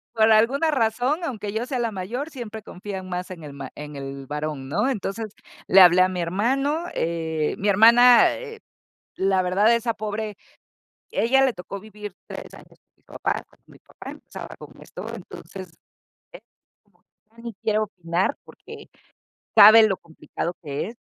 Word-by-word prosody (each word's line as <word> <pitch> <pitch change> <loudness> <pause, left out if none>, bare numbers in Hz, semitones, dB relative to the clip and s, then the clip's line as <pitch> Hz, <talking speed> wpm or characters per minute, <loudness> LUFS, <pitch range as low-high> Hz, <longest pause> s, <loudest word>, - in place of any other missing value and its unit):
Por 220 0 +4
alguna 270 +9 +3
razón, 250 +4 0
aunque 215 -9 -4
yo 230 +2 -2
sea 255 -2 -3
la 230 -2 -1
mayor, 235 +11 -5
siempre 225 -6 -8
confían 190 -1 -7
más 180 0 -5
en 165 -3 -9
el 145 -2 -9
ma 140 - -8
en 150 0 -8
el 135 0 -7
varón, 150 -2 -4
¿no? 255 - 0
Entonces, 220 -2 -3 0.4
le 190 0 +7
hablé 180 0 +7
a 185 - +4
mi 180 -1 -4
hermano, 270 - 0
eh, 160 -2 -2
mi 205 - -2
hermana, 235 +4 +7
eh, 455 -2 -9 0.6
la 190 -1 +2
verdad, 200 +5 +3
esa 235 0 0
pobre, 215 0 -5 0.8
ella 270 +4 +3
le 255 - 0
tocó 185 +2 -8
vivir 210 -2 -10
3 - - -9
años - - -16
con - - -65
mis - - -39
papás, - - -3
cuando - - -29
mi - - -18
papá - - -11
empezaba - - -10
con - - -12
esto, - - -9
entonces, - - -10 0.6
eh, - - -11 1.0
ya 230 - -14
ni 235 -3 -7
quiero 215 +1 0
opinar, 180 +4 -2
porque - - -13 0.7
sabe 220 +2 +9
lo 190 - -1
complicado 170 +1 -6
que 145 +5 -4
es, 235 - -9
210 Hz, 170 wpm, -23 LUFS, 180-235 Hz, 1.0 s, sabe